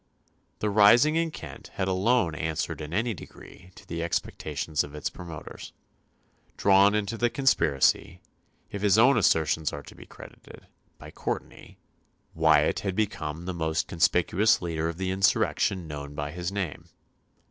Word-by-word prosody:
The 105 Hz, -, 0 dB
rising 115 Hz, +9 st, +6 dB
in 165 Hz, 0 st, +1 dB
Kent 80 Hz, -, -10 dB
had 95 Hz, -, -1 dB
alone 95 Hz, 0 st, +1 dB
answered 80 Hz, +2 st, -3 dB
in 75 Hz, 0 st, -7 dB
any 115 Hz, +5 st, 0 dB
degree 90 Hz, 0 st, -13 dB
to -, -, -16 dB
the 85 Hz, 0 st, -4 dB
expectations 80 Hz, -2 st, -2 dB
of 75 Hz, +1 st, -10 dB
its 75 Hz, -, -4 dB
promoters. 85 Hz, -4 st, -10 dB, 0.8 s
Drawn 100 Hz, +1 st, +5 dB
into 105 Hz, +2 st, -2 dB
the 120 Hz, -, +2 dB
conspiracy, 85 Hz, -, +1 dB, 0.5 s
if 100 Hz, -, -5 dB
his 100 Hz, -1 st, +3 dB
own 130 Hz, +5 st, +6 dB
assertions 80 Hz, -, +2 dB
are -, -, -7 dB
to -, -, -13 dB
be -, -, -14 dB
credited, -, -, -14 dB, 0.3 s
by -, -, -12 dB
Courtenay, -, -, -6 dB, 0.6 s
Wyatt -, -, +3 dB
had 95 Hz, -2 st, -3 dB
become 85 Hz, -6 st, -3 dB
the 90 Hz, -, -3 dB
most 80 Hz, -2 st, -1 dB
conspicuous 90 Hz, +4 st, +2 dB
leader 80 Hz, -2 st, -2 dB
of 85 Hz, -, -6 dB
the 95 Hz, 0 st, -2 dB
insurrection 95 Hz, -1 st, +1 dB
known 75 Hz, -1 st, -7 dB
by 75 Hz, 0 st, -4 dB
his 90 Hz, +2 st, -4 dB
name. 95 Hz, -6 st, -4 dB
90 Hz, 150 wpm, -27 LUFS, 80-105 Hz, 0.8 s, rising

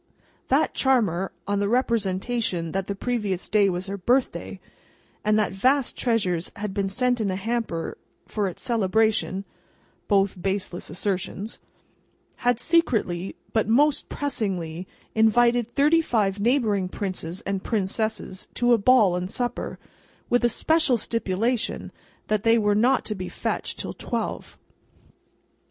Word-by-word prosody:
That -, -, +2 dB
charmer, 205 Hz, -9 st, +2 dB, 0.2 s
on 200 Hz, 0 st, 0 dB
the 200 Hz, 0 st, 0 dB
representation 215 Hz, -6 st, 0 dB
that 190 Hz, +1 st, -2 dB
the 200 Hz, -, -2 dB
previous 205 Hz, -5 st, -2 dB
day 205 Hz, -2 st, +4 dB
was 180 Hz, 0 st, -3 dB
her 200 Hz, +1 st, -5 dB
birthday, 250 Hz, +7 st, 0 dB, 0.6 s
and 215 Hz, 0 st, +3 dB
that 215 Hz, -3 st, +1 dB
vast 255 Hz, +7 st, +2 dB
treasures 190 Hz, -8 st, 0 dB
had 205 Hz, -1 st, -4 dB
been 195 Hz, -1 st, -1 dB
sent 245 Hz, +3 st, +1 dB
in 205 Hz, -, 0 dB
a 185 Hz, -, -1 dB
hamper 215 Hz, -4 st, -3 dB, 0.3 s
for 210 Hz, -2 st, -1 dB
its 180 Hz, -, -7 dB
celebration 220 Hz, -3 st, +1 dB, 0.6 s
(both 195 Hz, -3 st, +2 dB
baseless 190 Hz, -2 st, -2 dB
assertions), 195 Hz, +2 st, -3 dB, 0.8 s
had 245 Hz, -1 st, +1 dB
secretly 220 Hz, -, +1 dB, 0.2 s
but 220 Hz, -2 st, +2 dB
most 280 Hz, +6 st, +3 dB
pressingly 185 Hz, -, -2 dB, 0.3 s
invited 235 Hz, +1 st, +3 dB
thirty 300 Hz, +4 st, +4 dB
five 210 Hz, -9 st, 0 dB
neighbouring 210 Hz, -5 st, +1 dB
princes 185 Hz, -3 st, -4 dB
and 195 Hz, -1 st, -3 dB
princesses 215 Hz, -2 st, -2 dB
to 245 Hz, 0 st, +3 dB
a 230 Hz, -, +4 dB
ball 210 Hz, -5 st, +5 dB
and 180 Hz, +1 st, -3 dB
supper: 245 Hz, +2 st, -3 dB, 0.5 s
with 245 Hz, 0 st, +3 dB
a 240 Hz, -, +5 dB
special 315 Hz, 0 st, +2 dB
stipulation 230 Hz, +1 st, -1 dB, 0.3 s
that 215 Hz, -1 st, 0 dB
they 230 Hz, +1 st, +4 dB
were 210 Hz, -2 st, +2 dB
"not 245 Hz, +6 st, +3 dB
to 215 Hz, -, -1 dB
be 185 Hz, -3 st, -5 dB
fetched -, -, -3 dB
till -, -, -4 dB
twelve." -, -, -4 dB
210 Hz, 135 wpm, -25 LUFS, 190-240 Hz, 0.8 s, ball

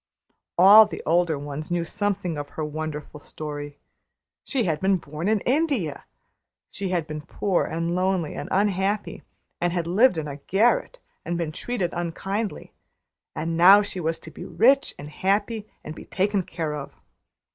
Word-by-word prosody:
All 205 Hz, +4 st, +9 dB
the -, -, -7 dB
older 170 Hz, -1 st, +2 dB
ones 145 Hz, +2 st, -6 dB
knew 175 Hz, -1 st, 0 dB
something 200 Hz, -2 st, -2 dB
of 145 Hz, -1 st, -5 dB
her 155 Hz, -, -1 dB
wonderful 150 Hz, 0 st, -5 dB
story. 145 Hz, -1 st, -7 dB, 0.7 s
She 265 Hz, -4 st, -1 dB
had 160 Hz, -6 st, 0 dB
been 190 Hz, 0 st, +2 dB
born 155 Hz, +1 st, -5 dB
in 215 Hz, -2 st, +2 dB
India; 255 Hz, -, 0 dB, 0.7 s
she 195 Hz, -1 st, -4 dB
had 175 Hz, -3 st, 0 dB
been 155 Hz, -1 st, -6 dB
poor 185 Hz, +4 st, -1 dB
and 165 Hz, +1 st, -2 dB
lonely 185 Hz, -3 st, 0 dB
and -, -, -6 dB
unhappy, 200 Hz, +1 st, 0 dB, 0.4 s
and 175 Hz, 0 st, +1 dB
had 175 Hz, -1 st, -1 dB
lived 190 Hz, +4 st, +4 dB
in 155 Hz, -1 st, -3 dB
a 140 Hz, -1 st, -6 dB
garret 215 Hz, -, +1 dB, 0.3 s
and 175 Hz, -, -2 dB
been 165 Hz, -3 st, -2 dB
treated 185 Hz, 0 st, -2 dB
unkindly; 195 Hz, +5 st, -4 dB, 0.6 s
and 165 Hz, +1 st, -2 dB
now 190 Hz, +5 st, +8 dB
she 195 Hz, -2 st, -5 dB
was 165 Hz, -1 st, -1 dB
to 160 Hz, -, -10 dB
be -, -, -9 dB
rich 270 Hz, +5 st, +3 dB
and 145 Hz, -, -8 dB
happy, 205 Hz, +5 st, -1 dB
and 155 Hz, -, -7 dB
be -, -, -11 dB
taken 200 Hz, +1 st, 0 dB
care 165 Hz, -3 st, -4 dB
of. 145 Hz, -2 st, -7 dB
175 Hz, 165 wpm, -24 LUFS, 155-200 Hz, 0.7 s, All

